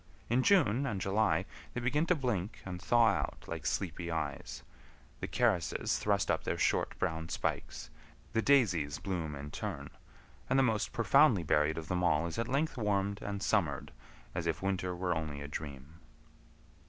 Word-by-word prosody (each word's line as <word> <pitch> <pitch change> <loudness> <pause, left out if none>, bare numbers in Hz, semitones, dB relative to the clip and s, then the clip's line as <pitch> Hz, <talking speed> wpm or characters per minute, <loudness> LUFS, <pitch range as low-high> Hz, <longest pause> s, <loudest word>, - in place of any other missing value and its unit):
In 125 +2 +4
June 140 - +4
and 100 -7 -2
July 100 +3 +1 0.3
they - - 0
begin 145 +7 +1
to 180 - +4
blink 110 - -2
and 90 -1 -6
thaw 120 -1 +5
out 100 - -2
like - - -4
sleepy 85 -2 -2
eyes, 75 -4 -4 0.6
the - - -3
carices - - +1
thrust 100 -2 +1
up - - 0
their - - -1
short - - +1
brown 80 0 -2
spikes, - - -3 0.4
the 110 - +2
daisies 90 - +3
bloom 85 -6 -3
in 70 +1 -7
turn, - - -5 0.6
and 130 - +3
the 135 - +5
most 110 -4 +1
profoundly 90 - +4
buried 75 0 +2
of 80 -1 -5
them 90 0 -1
all 85 -2 +3
is 85 +6 -4
at 115 - -1
length 140 +3 0
warmed 100 -2 0
and 100 -1 -4
summered - - 0 0.4
as - - -2
if - - 0
winter 95 -2 -1
were 90 0 0
only 80 -3 -3
a 70 - -6
dream. 75 +1 -7
95 Hz, 170 wpm, -32 LUFS, 80-115 Hz, 0.6 s, thaw